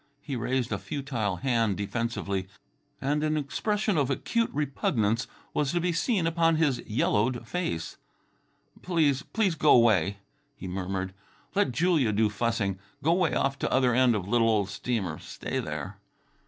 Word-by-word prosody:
He 140 -2 -5
raised 125 +1 -1
a - - -1
futile 130 -9 -2
hand 115 -3 +1
defensively, 100 -2 -2 0.5
and 145 +3 0
an 155 0 +1
expression 205 +6 0
of 140 -2 +1
acute 230 - 0
repugnance 125 -6 0 0.3
was 145 0 0
to 175 - +2
be 175 0 0
seen 185 +1 +1
upon 165 0 +3
his 150 -6 +2
yellowed 115 +2 +1
face. 125 - -3 0.8
"Please, 155 -6 +2
please 205 0 0
go 155 -4 +5
'way," 100 -5 +3 0.4
he 95 - -8
murmured. 95 +1 -3 0.4
"Let 200 -8 +2
Julia 150 -3 +2
do 105 0 +2
fussing. 105 -3 -1 0.2
Go 165 +3 +4
way 175 -7 +1
off 135 0 0
to - - -1
other 130 -2 +3
end 125 -1 +4
of 95 -3 -3
little 115 +1 +3
old 105 -3 +1
steamer; 100 -6 -2
stay - - -4
there." - - -5
125 Hz, 155 wpm, -28 LUFS, 105-155 Hz, 0.8 s, go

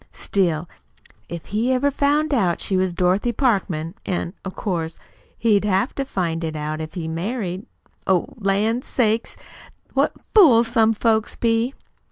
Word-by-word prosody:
Still, 175 -4 0 0.6
if 170 -1 -6
he 225 +5 0
ever 270 +2 +2
found 290 +2 +1
out 185 -9 +2
she 195 - -1
was 185 0 +1
Dorothy 185 +6 +1
Parkman, 190 - 0
an' 175 -1 -3
of 190 - -6
course 165 -5 -3 0.4
he'd 215 -3 +3
have 200 +4 +1
to 275 - -3
find 170 -8 -2
it 160 -1 -3
out 155 +1 -3
if 155 +3 -7
he 165 -3 -4
married 185 +3 -3 0.4
Oh, 185 -2 +3
lan' 215 +3 +1
sakes, 225 -3 0 0.6
what - - +2 0.2
fools 240 - +6
some 225 -2 +3
folks 220 0 +1
be!" 230 +3 +1
200 Hz, 150 wpm, -22 LUFS, 175-235 Hz, 0.6 s, fools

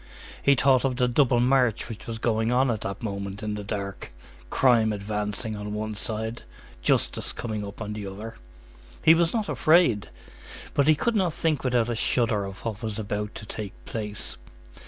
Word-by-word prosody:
He 140 - +5
thought 130 0 +4
of 135 -2 +1
the 125 0 +2
double 125 -1 +3
march 125 -2 +3
which 115 -3 -8
was 115 -1 -3
going 110 0 +1
on 130 +1 +3
at 110 -2 -3
that 100 +4 -5
moment 100 -1 -4
in 105 0 -2
the 105 0 -4
dark,—crime 105 - 0
advancing 105 +2 -2
on 105 0 -5
one 110 0 -3
side, 110 +2 -3 0.4
justice - - +1
coming 110 -3 -4
up 100 +2 -6
on 105 0 -5
the 105 -2 -5
other. 105 +4 -7 0.7
He 160 - +8
was 165 0 +3
not 220 -3 -1
afraid, 155 - +3 0.6
but 140 0 +2
he 155 - +6
could 235 +10 0
not 185 -6 +1
think 160 -3 0
without 125 -3 +2
a 120 - -1
shudder 110 -2 +1
of 95 +2 -9
what 110 -3 -3
was 110 -2 -3
about 105 -1 -3
to 105 - -8
take 105 -2 -6
place. 105 -2 -4
110 Hz, 180 wpm, -26 LUFS, 105-125 Hz, 0.7 s, He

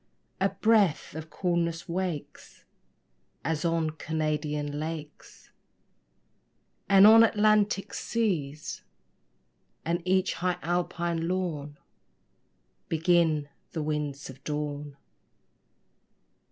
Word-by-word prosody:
A 195 +1 +3
breath 210 -8 +2
of 160 +1 -7
coolness 170 -2 -1
wakes, 175 -3 -5 0.8
As 155 -1 -1
on 165 -2 +1
Canadian 150 -2 -2
lakes, 155 -1 -8 1.4
And 195 0 +8
on 225 +1 +9
Atlantic 210 -2 +2
seas, 160 -11 -2 1.0
And 170 +2 0
each 185 +1 +2
high 180 0 -1
Alpine 170 0 -1
lawn 160 -6 -3 1.1
Begin 160 -2 +2 0.3
the 160 - -2
winds 150 -2 -3
of 130 +1 -12
dawn. 145 -1 -4
165 Hz, 85 wpm, -28 LUFS, 150-185 Hz, 1.4 s, on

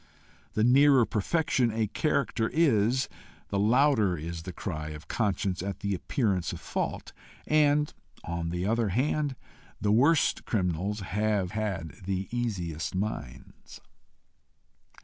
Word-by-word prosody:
The 110 - +2
nearer 135 +1 +6
perfection 125 - +1
a 110 0 0
character 125 0 0
is, 130 -4 +3 0.4
the 100 - 0
louder 110 -4 +3
is 85 +2 -5
the 90 - -7
cry 75 -2 -5
of 75 0 -9
conscience 100 -4 -1
at 100 +1 -5
the 100 0 -1
appearance 95 -1 0
of - - -6
fault; - - -4 0.3
and, 150 -1 +3 0.3
on 85 -1 -3
the 90 +2 -2
other 115 0 +1
hand, 140 +6 0 0.4
the 105 +1 +1
worst 140 +9 +3
criminals 95 +1 -1
have 100 -1 0
had 100 -6 -3
the 95 0 -2
easiest 90 -10 -3
minds. 75 - -6
105 Hz, 125 wpm, -28 LUFS, 90-125 Hz, 0.4 s, nearer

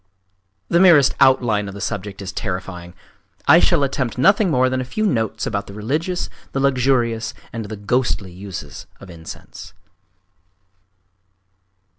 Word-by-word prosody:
….The 170 - +2
merest 160 -7 +6
outline 115 -6 +3
of 100 - -8
the - - -7
subject 100 0 -5
is 95 - -5
terrifying! 90 -3 -5 0.5
I 160 +4 +8
shall 170 -4 +3
attempt 130 -4 -2
nothing 195 - +4
more 130 -4 +3
than 130 0 -1
a - - -2
few 215 +12 -2
notes 110 - -1
about 100 -2 -3
the 100 - -10
religious, 155 - -2 0.3
the 135 - -1
luxurious, 120 -4 +1 0.2
and 115 -2 -4
the 110 +1 -7
ghostly 100 -2 -1
uses 90 -6 -8
of 95 - -12
incense. 80 -1 -11
115 Hz, 140 wpm, -20 LUFS, 100-135 Hz, 0.5 s, I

